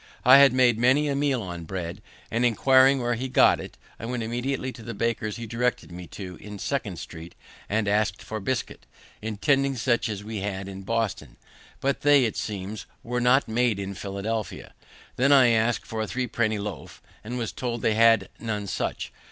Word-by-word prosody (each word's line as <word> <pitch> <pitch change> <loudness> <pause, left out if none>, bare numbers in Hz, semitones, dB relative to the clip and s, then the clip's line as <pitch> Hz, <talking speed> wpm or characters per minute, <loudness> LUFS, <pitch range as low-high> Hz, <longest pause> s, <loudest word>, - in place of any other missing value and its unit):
I 130 +2 +9
had 140 -2 +7
made 125 -3 +3
many 130 +5 +3
a 140 - 0
meal 140 -4 0
on 85 -2 -7
bread, 90 +3 -5 0.3
and, 115 +2 0
inquiring 130 +3 +5
where 120 0 +1
he 130 +3 -3
got - - +5
it, - - -9 0.2
I 115 - -6
went 120 -1 -3
immediately 125 +3 -2
to 120 - -12
the 115 0 -7
baker's 110 -1 -1
he 115 0 -6
directed 120 -2 -2
me 90 0 -8
to, 90 -2 -8
in 105 0 -9
Second 100 -6 -3
street, 80 +1 -9 0.3
and 105 0 0
ask'd 100 -2 0
for 110 - -5
bisket, 120 +4 -4 0.3
intending 135 +6 +1
such 120 -1 0
as 105 -2 -5
we 110 0 -5
had 95 -1 -4
in 95 0 -8
Boston; 100 - -3 0.4
but 140 0 0
they, 145 -3 +5
it 110 - -2
seems, 100 0 -5 0.2
were 125 +1 -2
not 125 +3 +4
made 115 -1 +1
in 100 0 -4
Philadelphia. 100 +3 -5 0.4
Then 135 +3 +3
I 130 -4 +7
asked 115 +1 +1
for 110 -1 -4
a 110 - -2
three 130 +3 -2
penny 110 -2 0
loaf, 100 -4 -7 0.2
and 120 +4 -5
was 115 -3 -3
told 120 -3 -4
they 110 - +3
had 115 -3 +4
none 105 -3 -3
such. - - -3
115 Hz, 195 wpm, -25 LUFS, 100-125 Hz, 0.4 s, I